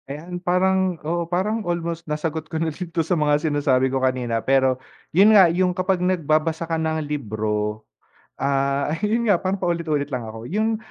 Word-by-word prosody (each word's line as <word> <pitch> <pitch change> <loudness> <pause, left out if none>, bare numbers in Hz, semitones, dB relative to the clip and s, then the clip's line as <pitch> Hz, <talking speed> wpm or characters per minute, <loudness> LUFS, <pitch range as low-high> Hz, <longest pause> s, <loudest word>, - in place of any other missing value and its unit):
Ayan 170 +5 -6
parang 185 0 +1
oo, 170 +1 -2
parang 205 +6 0
almost 170 -3 -3
nasagot 160 +1 -3
ko 160 - -3
na 160 -1 -1
din 180 +3 -6
'to 165 -1 -1
sa 170 - 0
mga 150 -3 +3
sinasabi 145 -4 +2
ko 135 - 0
kanina 125 -3 0
pero, 130 -1 +2 0.3
yun 195 +6 +6
nga, 190 - +9
yung 180 +1 +1
kapag 185 0 0
nagbabasa 165 -2 +1
ka 165 - -4
ng 160 -1 -1
libro, 110 -6 -3 0.5
ah, 140 +1 0
yun 220 +3 +1
nga, 175 - +2
parang 190 +1 -1
paulit-ulit 165 -6 -1
lang 120 -3 -3
ako. 110 +1 -8
Yung 220 +2 +1
160 Hz, 175 wpm, -22 LUFS, 140-180 Hz, 0.5 s, nga